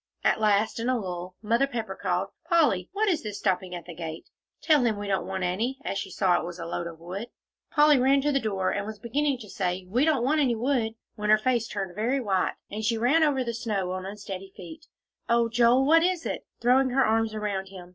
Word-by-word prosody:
At - - +3
last, 215 +1 +2
in 235 +2 -1
a 255 - +2
lull, 180 -3 -5
Mother 235 +5 +2
Pepper 230 -5 -4
called, - - -1 0.2
"Polly, 290 - +3
what 420 +3 0
is 340 -5 +1
this 210 -6 -5
stopping 185 -2 -1
at 175 - -8
the 175 - -8
gate? 160 -1 -7 0.3
Tell 300 -5 +3
him 225 -3 +1
we 205 0 -5
don't 195 -1 -1
want 190 -1 -3
any," 220 +9 -1
as 195 - -2
she 195 - -5
saw 180 -1 +2
it - - -5
was 175 0 -6
a 165 - -6
load 170 0 -3
of 165 -1 -9
wood. 185 +7 -6 0.4
Polly 295 -2 +5
ran 270 +2 +4
to 295 +2 +1
the 275 - +2
door, 195 -5 -1
and 205 0 -2
was 220 -1 -6
beginning 270 +6 0
to 215 - -10
say, 185 -2 -2
"We 240 +8 +1
don't 300 -6 +2
want 300 +4 +2
any 250 -4 +2
wood," 230 -2 0 0.2
when 210 -1 -3
her 215 - +7
face 235 0 0
turned 195 -5 -4
very 235 +7 0
white, 195 -7 0 0.2
and 215 +2 -4
she 225 +1 +1
ran 265 +8 +3
over 280 -4 +2
the 235 -1 -3
snow 210 -6 -2
on 185 0 -4
unsteady 195 -1 -7
feet. 320 0 -11 0.4
"Oh, 235 0 +3
Joel, 240 +3 +4
what 325 +3 +6
is 355 -1 0
it?" - - -4
throwing 255 +2 +4
her 265 +1 +3
arms 220 0 +1
around 200 -3 -2
him. 185 -2 -11
220 Hz, 235 wpm, -27 LUFS, 190-260 Hz, 0.4 s, her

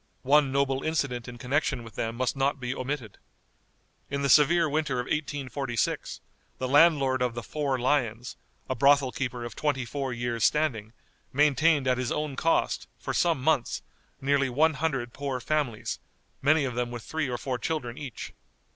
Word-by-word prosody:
One 140 +1 +4
noble 135 -1 +1
incident 140 -7 -1
in 120 0 -8
connection 130 -1 -1
with 115 - -11
them 115 0 -3
must 130 +2 -1
not 135 +1 0
be 125 0 -3
omitted. 130 -5 -5 0.9
In 140 0 -2
the 140 - +1
severe 160 +4 +5
winter 150 -2 0
of - - 0
1846, 140 -5 -2 0.4
the 130 - -2
landlord 140 -3 +4
of 125 -2 0
the 120 - -4
"Four 140 +3 -1
Lions," 125 -2 0 0.3
a 130 - 0
brothel 140 +1 +4
keeper 125 -3 -3
of 120 - -7
twenty 140 -4 0
four 135 +2 -3
years' 120 -2 -2
standing, 120 -8 +1 0.4
maintained 150 0 +3
at 125 -1 +2
his 125 -1 -2
own 150 -2 -2
cost, 165 +5 +1
for - - -4
some 170 -5 +2
months, 150 -4 +1 0.4
nearly 140 0 +2
one 155 +6 +3
hundred 135 -5 -2
poor 140 -2 -3
families, 130 -3 -2 0.4
many 145 +1 +4
of 125 - -3
them 120 0 -1
with 120 -2 -7
three 160 -4 -2
or 120 - -2
four 125 0 -3
children 120 -3 -3
each. 140 -5 -7
135 Hz, 170 wpm, -27 LUFS, 125-150 Hz, 0.9 s, severe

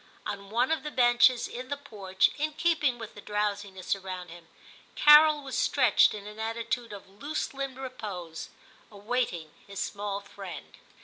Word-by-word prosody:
On 200 -1 -5
one 240 +6 +1
of 320 - +1
the 300 - -5
benches 245 -2 +4
in 250 +1 -7
the 285 - -2
porch, 190 -8 0
in 305 +1 -1
keep 330 0 +1
ing 255 -4 +2
with 225 -3 -8
the 205 - -11
drowsiness 205 -2 -2
around 185 -2 -7
him, 170 0 -13 0.5
Carol 300 0 +7
was 265 -3 -5
stretched 250 -6 +4
in 205 -1 -8
an 210 +1 -10
attitude 230 +1 -3
of 200 -2 -10
loose 280 +13 -4
limbed 270 -1 -5
repose, 205 -11 -7 0.4
awaiting 205 -7 -2 0.2
his 200 -1 -7
small 205 -1 -3
friend. 195 -2 -10
220 Hz, 165 wpm, -28 LUFS, 200-260 Hz, 0.5 s, Carol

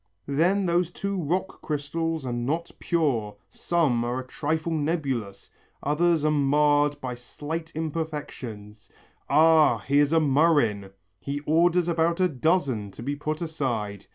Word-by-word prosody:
Then 175 +8 +2
those 175 0 +1
two 200 +2 -4
rock 185 +2 -2
crystals 160 +1 -3
are 125 - -3
not 145 +8 -2
pure, 125 -11 0 0.2
some 150 -9 +1
are 120 +1 -2
a 130 - -6
trifle 155 +5 -2
nebulous, 140 - -2 0.3
others 160 +2 +2
are 155 - +3
marred 145 0 +2
by 130 -2 -4
slight 150 +7 -6
imperfections. 145 -10 -5 0.4
Ah! 155 -3 +5
here's 140 +6 +2
a 165 - +4
murrhine. 140 -9 +2 0.3
He 140 +1 -4
orders 170 +3 +3
about 170 0 +1
a 185 - +4
dozen 140 - 0
to 115 - -9
be 140 +3 -2
put 155 +3 -3
aside. 115 - -3
150 Hz, 135 wpm, -26 LUFS, 130-165 Hz, 0.4 s, Ah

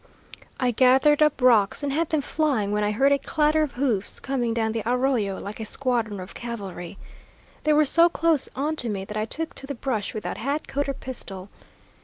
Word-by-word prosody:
I 250 -2 +2
gathered 265 +5 +4
up 300 -2 +3
rocks 230 0 +4
and 280 -1 -1
had 325 +2 0
them 310 -2 +1
flying 275 -9 0
when 210 0 0
I 210 - +1
heard 270 +7 +3
a 280 - +3
clatter 305 +2 +1
of 300 -4 -1
hoofs 245 -7 -1
coming 255 -4 -1
down 225 -1 0
the 225 0 -2
arroyo 245 -4 0
like 205 +2 -7
a - - -3
squadron 230 -4 -2
of 185 +1 -8
cavalry. 200 -6 -7 0.7
They 305 - +4
were 300 0 +4
so 335 +4 +5
close 330 -4 +1
on 295 +4 -1
to 240 - -2
me 195 -2 -3
that 210 - -8
I 215 0 -1
took 325 +8 -1
to 270 - -8
the 280 - -4
brush, 230 -5 -3
without 215 - -4
hat, 280 +5 -2
coat, 280 +1 -2
or 275 - -2
pistol. 200 -8 -8
255 Hz, 210 wpm, -25 LUFS, 215-285 Hz, 0.7 s, so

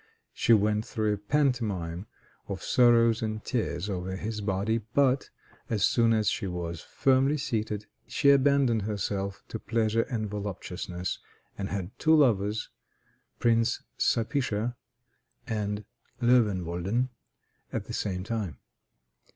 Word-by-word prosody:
She - - +1
went 105 -1 +4
through 110 -2 -1
a - - -2
pantomime 105 - 0 0.4
of - - -5
sorrows 115 -2 +4
and 110 -1 -3
tears 105 -6 -1
over 95 -1 -3
his 105 +2 -4
body, 100 +3 0 0.2
but, 135 -1 +3 0.4
as 105 -4 +2
soon 115 -1 +3
as 110 -2 +2
she 110 -5 0
was 85 -2 -4
firmly 135 +2 +2
seated, 110 -5 -2 0.2
she 140 - +4
abandoned 140 -4 +4
herself 100 -1 -3
to 110 - -4
pleasure 115 0 +1
and 110 -4 -2
voluptuousness, 95 -3 -4 0.4
and 100 0 -4
had 100 0 -5
two 160 0 +5
lovers, 110 -7 +2 0.7
Prince 115 0 +2 0.2
Sapicha 115 -1 +1 0.7
and 105 -2 -2 0.3
Loewenwolden, 105 -2 +2 0.6
at - - -3
the - - -7
same 90 -3 -2
time. 105 - -3
110 Hz, 120 wpm, -28 LUFS, 100-120 Hz, 0.7 s, two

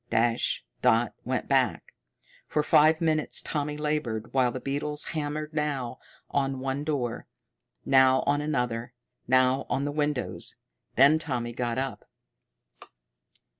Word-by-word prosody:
Dash 115 +1 +1 0.2
dot 120 -2 +3
went - - -2
back. - - +1 0.5
For 150 - 0
five 155 +2 +5
minutes 155 -2 +1
Tommy 150 -1 -2
labored, 150 -8 -2
while 130 -2 +3
the 130 - -5
beetles 145 +3 -3
hammered 150 0 -3
now 140 -5 -2 0.3
on 135 -1 0
one 135 +2 -2
door, 135 -6 -2 0.6
now 130 -1 +5
on 145 +1 +2
another, 125 -5 -2 0.3
now 130 +1 +3
on 135 +3 0
the 145 - -1
windows. 145 -3 -1 0.4
Then 140 +4 +6
Tommy 120 -6 -3
got 120 0 -2
up. 135 0 -4
135 Hz, 125 wpm, -27 LUFS, 125-150 Hz, 0.6 s, Then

